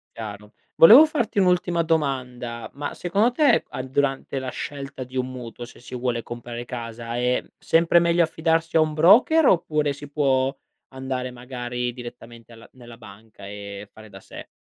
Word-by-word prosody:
Chiaro. 105 -2 -9 0.2
Volevo 235 - +9
farti 270 -9 -1
un'ultima 180 -2 +2
domanda: 125 -7 -2
ma 145 +1 -5
secondo 205 +7 0
te 280 -2 +3
a - - -6
durante 135 +1 -2
la 130 - -6
scelta 140 0 -7
di 130 +1 -9
un 130 0 -1
mutuo, 120 -1 -8
se - - -16
si 125 - -13
vuole 120 -2 -2
comprare 120 0 -7
casa, 115 -1 -6
è 125 +1 0
sempre 165 +1 +3
meglio 170 0 +3
affidarsi 165 0 0
a - - +5
un 155 -1 0
broker 230 - +5
oppure 155 -4 +2
si 145 +1 -9
può 135 -2 0 0.4
andare 130 -1 -4
magari 125 0 -5
direttamente 120 -1 -12
alla 115 0 -15
nella 120 -2 -13
banca 110 -1 -14
e 100 0 -9
fare 110 0 -14
da 95 -1 -13
sé? - - -11
130 Hz, 165 wpm, -23 LUFS, 120-160 Hz, 0.4 s, Volevo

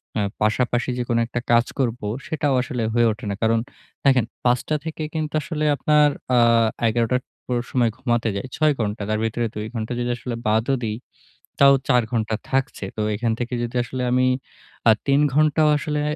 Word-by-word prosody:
অ্যা 105 - +1 0.2
পাশাপাশি 120 +3 +1
যে - - 0
কোনো 115 -1 +2
একটা 120 - -3
কাজ 120 0 +5
করব 125 -2 0 0.3
সেটাও 150 -3 0
আসলে 125 -2 -3
হয়ে 120 -1 +4
ওঠে 110 +2 -7
না। - - -2
কারণ 115 0 +3 0.5
দেখেন 130 -4 +4 0.2
৫ 125 0 +4
টা 155 - +2
থেকে 160 -1 -4
কিন্তু 155 -1 -2
আসলে 155 0 -3
আপনার 150 0 +4 0.3
আ - - +6 0.5
১১ 115 +1 +1
টার 125 - +2 0.2
পুরো 120 -1 -1
সময় 120 -3 +2
ঘুমাতে 120 -3 0
যাই। 115 +7 -4
৬ 155 -2 +3
ঘন্টা। 105 -1 -2
তার 110 0 0
ভেতরে 115 +1 -1
২ 105 - -4
ঘন্টা 110 +1 -3
যদি 120 - -1
আসলে 120 0 -5
বাদও 110 +5 +2
দেই 110 -1 -2 0.6
তাও 140 0 +8 0.2
৪ 125 -2 +4
ঘন্টা 110 -2 0
থাকছে। 135 -6 -1
তো 110 - -2
এখান 115 +2 0
থেকে 120 +1 -3
যদি 120 +1 -5
আসলে 125 +1 -4
আমি 130 0 +3 0.6
আ - - +9 0.2
৩ 140 +1 +4
ঘন্টাও 155 +1 +3
আসলে 150 0 -2
120 Hz, 190 wpm, -22 LUFS, 115-140 Hz, 0.6 s, আ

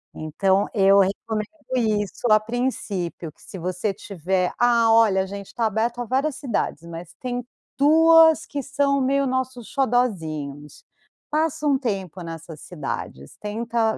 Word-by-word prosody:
Então 190 +6 +1
eu 195 -1 +5
recomendo 210 +2 0 0.3
isso, 215 -1 0
a 215 - +7
princípio. 215 -8 -3
Que - - -27
se - - -10
você 185 +3 -2
tiver: 185 -2 -2
“Ah, 235 -2 +4
olha, 215 -4 +5
a - - -5
gente 200 0 -8
está 235 - -2
aberto 225 +3 0
a 245 - -2
várias 270 +4 0
cidades, 235 - -2
mas 170 0 -9
tem 245 -1 -3 0.3
2 320 +2 +6
que 285 - -4
são 280 +1 +1
meio 275 +1 +2
nossos 260 -2 -2
xodózinhos”, 160 - -2 0.5
passa 310 0 0
um 275 -2 +3
tempo 195 - -3
nessas 165 -2 -8
cidades, 110 - -6
tenta 225 +1 -1
220 Hz, 140 wpm, -23 LUFS, 185-255 Hz, 0.5 s, a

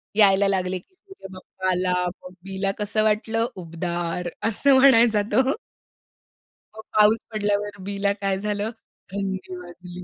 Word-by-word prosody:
यायला 200 -2 +5
लागले, 185 -1 0
की 370 - -27
"सूर्य 385 - -13
बप्पा 185 0 -5
आला, 180 0 +1 0.3
मग 180 - -10
बीला 195 0 -2
कसं 210 +1 +1
वाटलं? 220 +1 +1
उबदार." 175 0 -3 0.2
असं 270 +6 +3
म्हणायचा 230 -5 +6
तो. 265 +7 +2 1.2
मग 220 - -8 0.2
पाऊस 215 +2 +5
पडल्यावर 205 -1 -1
बीला 200 +1 -1
काय 195 -1 0
झालं? 210 +1 -2 0.4
थंडी 190 -2 -4
वाजली. 180 0 -10
200 Hz, 130 wpm, -24 LUFS, 185-215 Hz, 1.2 s, म्हणायचा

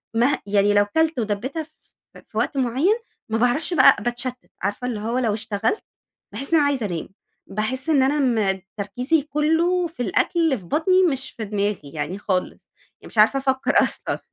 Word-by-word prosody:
مه 245 +5 +3
يعني 205 0 +3
لو 205 0 +4
كَلت 320 +6 +1
ودبِّتها 235 +9 -2
ف 305 - -19 0.6
في - - -10
وقت 280 - 0
معيّن، 265 - +2 0.3
ما 225 - 0
باعرفش 250 +9 +1
بقى 265 -8 +6
باتشتِّت، 240 +1 -3 0.2
عارفة 205 +6 -2
اللي 225 -4 -3
هو 230 +4 -2
لو 230 -5 +1
اشتغلت، 220 - -2 0.5
باحِس 275 - -5
إن - - +7
أنا 290 - +3
عايزة 265 -6 0
أنام، 175 -4 -4 0.4
باحِس 255 +8 -3
إن 280 -4 +4
أنا 290 +3 +2
م 215 -8 +1 0.2
تركيزي 250 +10 0
كُلّه 320 +5 +1
في 310 -7 -5
الأكل 340 - 0
اللي 320 -6 +3
في 185 - -13
بَطني، 370 - +3
مش 270 -6 -1
في 220 - -6
دماغي 200 -7 -2
يعني 155 +5 -3
خالص، 185 -3 -3 0.3
يعني - - -12
مش - - -13
عارفة 225 +6 +5
أفكّر 265 -1 0
أصلًا، - - -2
245 Hz, 185 wpm, -22 LUFS, 205-295 Hz, 0.6 s, إن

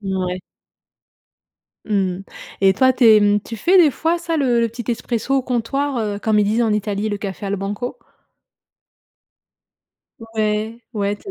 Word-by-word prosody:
Mouais. 185 -2 -2 1.5
Mmh - - -14 0.3
mh. - - -9 0.4
Et 195 -1 +5
toi 260 +5 +4
tu 250 - +1
es, 215 -1 +7
mmh, 205 0 +3
tu 230 - -7
fais 365 - +4
des 315 -5 +6
fois 330 +5 0
ça 335 -1 -2
le 250 -5 +2
le 230 - +1
petit 235 +1 -8
expresso 235 +2 -2
au 265 - +2
comptoir, 260 +2 -1
heu, 210 -2 -2
comme 215 0 +1
ils 210 - +4
disent 220 +4 +1
en 220 - +1
Italie 210 0 -1
le 205 -1 -3
café 200 0 -5
al 200 +1 -1
banco? 205 +5 -4 2.4
Ouais. 215 +1 -1
Ouais, 205 -1 -1
toi 390 - -10
220 Hz, 170 wpm, -20 LUFS, 205-250 Hz, 2.4 s, es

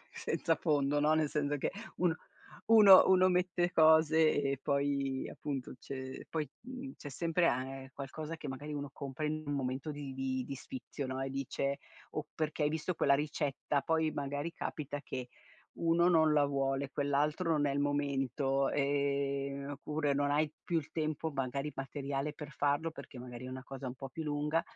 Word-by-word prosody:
senza 165 -2 0
fondo, 145 -2 +2
no, 150 +1 +4
nel 155 -1 +2
senso 145 0 0
che - - -1 0.3
uno 175 -3 +2 0.5
uno 210 -4 +9
uno 185 0 +6
mette 180 -1 +1
cose 160 -1 +5
e 140 -1 0
poi 140 -1 0
appunto 135 -4 -5
c'è 130 -1 -7
poi, 155 -3 -2
mhmm, 260 +2 -7
c'è 145 - -8
sempre 170 +4 +2
a 130 +1 +1
ehm, 135 0 -7
qualcosa 150 +4 -6
che 150 - -7
magari 145 +3 -5
uno 145 -1 -4
compra 140 +2 -5
in 155 +1 -2
un 145 - -1
momento 135 +2 -2
di 145 -2 -6
di 130 -1 -2
di 140 - -5
sfizio 155 - -6
no, 130 0 -3
e 135 - -1
dice, 135 +1 -2 0.3
o 155 - -3
perché 155 -1 -1
hai - - +3
visto 160 +3 -2
quella 140 -3 +4
ricetta. 145 -1 -1
Poi 160 +2 +1
magari 145 +3 -3
capita 145 -3 -4
che 125 -3 -5 0.5
uno 170 +1 +3
non 160 -3 +5
la 145 -1 +5
vuole, 135 -1 0
quell'altro 145 +5 +1
non 150 -2 +3
è 140 - +1
il 140 - -1
momento, 140 -1 +1
ehm, 140 0 0
oppure 145 +1 -1
non 145 0 +1
hai 150 +1 +2
più 175 - -1
il 155 - -7
tempo 155 0 -1
magari 140 +2 -2
materiale 140 +1 -3
per 150 -1 -8
farlo 145 +3 +1
perché 145 -4 -10
magari 125 0 -8
è - - -6
una 130 0 -6
cosa 135 0 -7
un 125 - -4
po' 135 0 -8
più 160 - -5
lunga, 150 +2 0
145 Hz, 180 wpm, -33 LUFS, 135-155 Hz, 0.5 s, uno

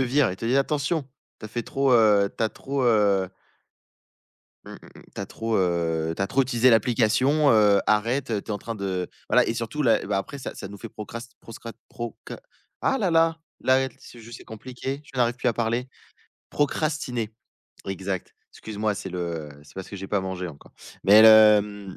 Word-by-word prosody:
vire, 130 -1 +2
il 90 - -6
te 115 - -7
dit: 120 +4 +2
«Attention! 140 +1 0 0.3
Tu - - -12
as - - -6
fait 120 +2 -4
trop, 135 +3 0
heu, 105 -4 +5
tu - - -2
as 110 - +2
trop, 135 +4 -4
heu» 100 -5 +3 1.4
«mmh - - -10
mh, - - -9 0.2
mmh. - - -14
Tu - - -6
as - - -4
trop, 115 0 -2
heu, 85 -3 0
tu - - -2
as - - +1
trop 135 +6 +2
utilisé 125 0 +3
l'application, 125 +6 +3
heu, 105 -2 +5
arrête, 115 +6 +1
tu 115 - -5
es 105 0 -3
en 105 - -2
train 115 +3 -6
de», 95 -3 -3 0.2
voilà - - +4
et - - 0
surtout, 115 +6 -3
là 120 -5 +3
et - - -7
bah, 100 0 -1
après 120 +8 -4
ça 130 - -7
ça - - -8
nous 100 0 -10
fait - - -8
procrast 115 +3 -9
proscra 115 0 -10 0.2
proca 120 -2 -8 0.5
ah, 270 - +2
là, 195 -7 0
là! 165 0 +3 0.2
Là 130 0 +3
et - - -3
c'est 120 - -14
juste, 115 +1 -11
c'est - - -14
compliqué, 130 +5 -7
je 135 - -14
n'arrive 120 0 +2
plus 125 - 0
à - - +2
parler. 120 +2 -1 0.6
Procrastiner, 145 -6 -1 0.6
exact. 95 -1 -4 0.2
Excuse-moi, 105 -1 -3
c'est 95 - -6
le 85 -4 -4
c'est 75 - -19
parce 95 -1 -7
que - - -9
j'ai 95 0 -7
pas 100 -2 0
mangé 95 -1 -4
encore. 70 -3 -14 0.3
Mais 105 +2 +8
le, 110 -1 +8
mmh 100 -2 -9
115 Hz, 210 wpm, -25 LUFS, 100-130 Hz, 1.4 s, Mais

